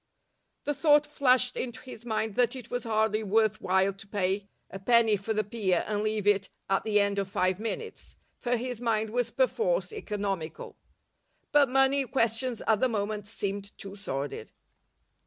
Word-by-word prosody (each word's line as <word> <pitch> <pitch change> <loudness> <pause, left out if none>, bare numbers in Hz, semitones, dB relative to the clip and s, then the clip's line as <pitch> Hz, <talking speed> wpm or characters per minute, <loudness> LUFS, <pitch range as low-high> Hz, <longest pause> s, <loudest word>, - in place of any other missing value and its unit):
The 290 - 0
thought 295 +1 +4
flashed 255 -4 +2
into 240 -3 -4
his 240 -2 -11
mind 220 -1 -1
that 245 +3 +2
it 250 -3 -9
was 245 -1 -2
hardly 220 -1 +1
worth 215 0 +1
while 190 +1 +2
to 195 +1 -13
pay 195 0 -1 0.2
a 195 - -7
penny 225 +1 +4
for 200 +3 -4
the 215 0 +1
pier 195 -4 0
and 210 -1 -1
leave 215 -1 -1
it 200 -1 +3 0.2
at 195 0 +1
the 210 -1 +2
end 200 0 +1
of 195 -1 -2
five 185 -1 0
minutes, 440 - -6 0.2
for 245 0 0
his 245 0 -5
mind 220 -2 0
was 245 0 0
perforce - - 0
economical. 200 - -4 0.8
But 285 -2 +5
money 270 +1 +3
questions 235 -1 0
at 220 -2 +3
the 255 - +2
moment 210 -1 -2
seemed 200 -1 -5
too 200 -1 -8
sordid. 140 -8 -5
220 Hz, 170 wpm, -28 LUFS, 200-245 Hz, 0.8 s, But